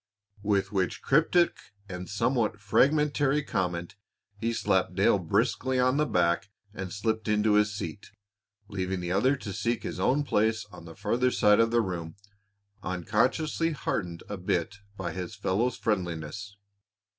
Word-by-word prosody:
With 100 -2 +1
which 95 -4 -1
cryptic 165 +5 +3 0.3
and 90 -2 -7
somewhat 115 0 0
fragmentary 145 +5 +2
comment, 90 -7 -2 0.4
he 115 +3 -2
slapped 115 - +1
Dale - - +4
briskly 130 0 0
on 130 +2 +3
the 150 0 +2
back 85 +2 +1 0.2
and 95 -3 -6
slipped 110 +2 -2
into 105 0 +3
his 105 0 +4
seat, 100 -2 -6 0.6
leaving 95 -2 -3
the 90 0 -3
other 130 +9 +3
to 105 -7 -7
seek 120 +4 -1
his - - -5
own 140 +4 +2
place 110 -4 +1
on 90 -2 -12
the 80 -1 -11
farther 125 +2 +1
side 105 -3 +4
of 115 0 +4
the 120 0 +3
room, 85 -5 -4 0.7
unconsciously 125 - 0
heartened 90 - -3
a 105 - -5
bit 90 +2 -2 0.2
by 90 -4 -3
his 90 +5 -5
fellow's 105 +5 0
friendliness. 95 0 -3
105 Hz, 145 wpm, -28 LUFS, 95-120 Hz, 0.7 s, Dale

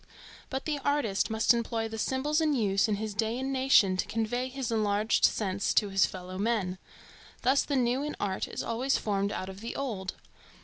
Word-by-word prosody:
But 265 0 -4
the 300 -2 -1
artist 280 -9 0
must 220 +2 +4
employ 230 -1 -1
the 225 0 -6
symbols 290 +7 0
in 305 -2 +2
use 200 -4 +2
in 210 - +1
his 215 +1 -4
day 220 +3 -1
and 265 +1 -2
nation 260 -8 +4
to - - -1
convey 245 +3 -1
his 260 -3 -4
enlarged 215 0 +1
sense 195 -2 0
to 205 - +3
his 195 0 +3
fellow 185 0 -7
men. 200 -4 0 0.6
Thus 265 +2 +4
the 285 - -2
new 250 +1 +1
in 300 +1 -3
art 195 -2 -2
is - - -5
always 255 +4 0
formed 200 -1 -1
out 185 - -4
of 190 +1 -9
the 230 - -5
old. 210 -9 -3
225 Hz, 200 wpm, -29 LUFS, 200-260 Hz, 0.6 s, must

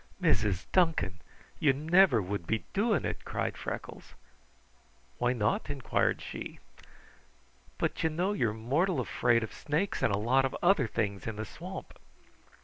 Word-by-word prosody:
"Mrs. 105 - +2
Duncan! 160 - +2 0.4
You 145 -3 +4
never 155 - +4
would 90 -2 -4
be 110 0 -1
doing 210 +1 +2
it," - - -3
cried - - -2
Freckles. - - -7 1.0
"Why 120 - +2
not?" 115 +3 0
inquired 140 -3 0
she. - - -7 1.2
"But - - -1
you 160 - +3
know 180 +6 0
you're 120 - +1
mortal 135 - 0
afraid 120 -1 +2
of 110 - -6
snakes 160 +7 -1
and - - +3
a 100 - +1
lot 125 +6 +3
of 135 - -1
other 175 -8 +4
things 100 -4 -2
in 115 - -3
the 110 +1 -4
swamp." 180 - -9
130 Hz, 145 wpm, -30 LUFS, 110-170 Hz, 1.2 s, You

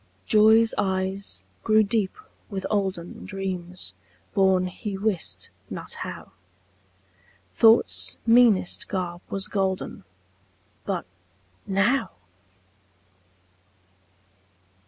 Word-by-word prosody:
Joy's 220 +1 +5
eyes 190 0 -2 0.2
grew 215 -1 +5
deep 210 -2 0 0.3
with 195 -3 -4
olden 190 -4 -2
Dreams, 185 -2 -5 0.4
born 190 -2 +3
he 195 +2 -5
wist 200 -4 -2 0.2
not - - -6
how; - - -7 1.2
Thought's 225 0 +4
meanest 230 -6 +4
garb 175 -2 -3
was 195 0 -2
golden; 190 - -2 0.8
But - - -2 0.6
now! 200 +8 +1
195 Hz, 75 wpm, -25 LUFS, 190-215 Hz, 1.2 s, Joy's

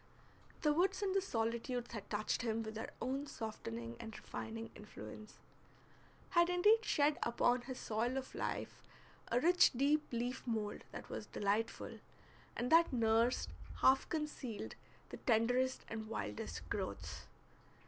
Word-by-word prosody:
The 300 -1 +5
woods 375 +4 +2
and 385 -2 +1
the 390 - +4
solitudes 235 -4 -1
had 215 -4 -6
touched 215 +3 0
him 225 -1 0
with 220 0 -5
their 220 +1 -4
own 270 +3 -2
softening 115 - -5
and 220 -1 -7
refining 225 0 -6
influence; 215 0 -10 0.9
had 345 0 +5
indeed 420 +6 +5
shed 295 -5 +3
upon 245 +1 +3
his 255 +1 -6
soil 235 +4 0
of 265 -1 -4
life - - -3 0.5
a 240 - +4
rich 355 +6 +6
deep 285 +5 +3
leaf 245 +2 -1
mould 220 -3 -2
that - - -8
was - - -5
delightful, 210 +3 -1 0.6
and 245 - -1
that 335 +1 +7
nursed, 230 0 +3 0.3
half 265 +1 +5
concealed, 300 - -3 0.4
the - - -6
tenderest 245 +2 +2
and 220 -1 -5
wildest 105 - -4
growths. - - -4
245 Hz, 140 wpm, -37 LUFS, 225-290 Hz, 0.9 s, that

